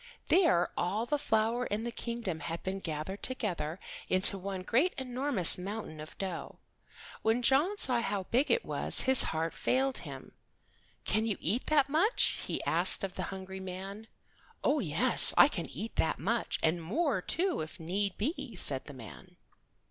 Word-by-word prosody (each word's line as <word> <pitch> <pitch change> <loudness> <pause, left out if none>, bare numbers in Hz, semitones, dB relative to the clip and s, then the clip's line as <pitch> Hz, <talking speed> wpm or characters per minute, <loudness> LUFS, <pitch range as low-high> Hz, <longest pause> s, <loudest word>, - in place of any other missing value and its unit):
There 335 - +3
all 205 +6 -2
the 295 +3 -1
flour 225 0 0
in 210 +2 -3
the 235 - -4
kingdom 230 -8 -5
had 165 0 -6
been 190 +1 -4
gathered 165 +3 -5
together 180 -10 -3 0.3
into 185 +2 +6
one 195 -1 -6
great 270 - +1
enormous 255 - +4
mountain 195 -4 -7
of 155 - -11
dough. 190 -3 -6 0.6
When 225 +3 0
John 295 - +2
saw 250 -9 +1
how 205 -4 -3
big 250 +9 0
it 475 - +1
was - - +4
his 265 -1 +3
heart 160 0 -3
failed 265 +1 0
him. - - -10 0.7
"Can 220 +1 0
you 210 - -2
eat 220 +9 -2
that 290 -3 +3
much?" 335 - +1
he - - -4
asked - - +3
of 190 -2 -4
the - - -4
hungry 190 0 -8
man. 190 +3 -8 0.6
"Oh, - - +2
yes, - - +5
I - - +8
can - - -5
eat 225 - -7
that - - 0
much, 230 +7 -2
and 165 +2 +1
more, 230 - -1
too, 360 - -1
if 155 +5 -8
need 185 +3 -2
be," 245 - -4
said 135 -6 0
the 145 - -11
man. 100 - -13
205 Hz, 170 wpm, -30 LUFS, 180-255 Hz, 0.7 s, I